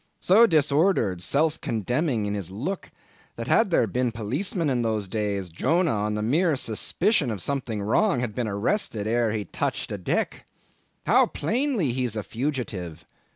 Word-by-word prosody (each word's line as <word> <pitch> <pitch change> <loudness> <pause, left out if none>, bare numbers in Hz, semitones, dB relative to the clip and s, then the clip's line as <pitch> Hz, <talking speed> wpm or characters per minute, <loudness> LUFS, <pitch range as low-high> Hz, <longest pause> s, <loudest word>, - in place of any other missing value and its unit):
So 220 +6 +6
disordered, 150 - +2
self 155 - +1
condemning 120 - -1
is 100 - -2
his - - -9
look, 150 - -4 0.5
that - - -6
had - - +3
there - - +3
been 125 -1 -1
policemen 140 - -1
in 125 -3 +1
those 110 -3 -1
days, 100 -2 -2
Jonah, 165 - +1
on 105 0 -1
the 105 - -2
mere 155 +7 +2
suspicion 140 - 0
of 110 -3 -3
something 120 -3 -2
wrong, 150 - +2
had 120 -4 -3
been 120 0 -2
arrested 105 - -1
ere 115 0 +1
he 105 -2 -3
touched - - -3
a 105 - -4
deck. 90 - -2 0.6
How - - +5
plainly 225 - 0
he's 125 -2 -2
a 105 - -3
fugitive! 110 - -4
120 Hz, 160 wpm, -25 LUFS, 105-155 Hz, 0.6 s, So